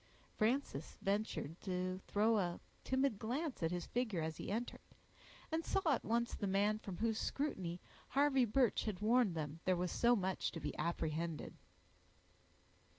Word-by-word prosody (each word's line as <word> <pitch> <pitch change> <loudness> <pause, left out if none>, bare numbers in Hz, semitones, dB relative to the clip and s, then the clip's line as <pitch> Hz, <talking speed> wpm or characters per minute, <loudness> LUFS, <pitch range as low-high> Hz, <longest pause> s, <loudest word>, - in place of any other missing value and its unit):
Frances 220 - 0
ventured 200 -5 -1
to 185 0 -2
throw 215 +2 +3
a 175 -2 -1 0.2
timid 260 -5 +1
glance 265 - -2
at 165 - +2
his 175 0 -2
figure 220 -9 -1
as 160 -1 -3
he - - -5
entered, 230 +4 -3 0.7
and 320 +1 0
saw 390 - +1
at 245 - -1
once 235 +1 +1
the 205 - -2
man 205 +2 +2
from 195 -4 -6
whose 225 -1 +1
scrutiny 185 - -2 0.3
Harvey 275 -2 +4
Birch 240 +1 +2
had 210 -5 -2
warned 220 -3 +3
them 155 0 -3
there 185 -1 +3
was 180 0 -1
so 240 0 +4
much 190 -3 -1
to 165 - -4
be - - -4
apprehended. 165 -1 -2
205 Hz, 155 wpm, -38 LUFS, 175-240 Hz, 0.7 s, Harvey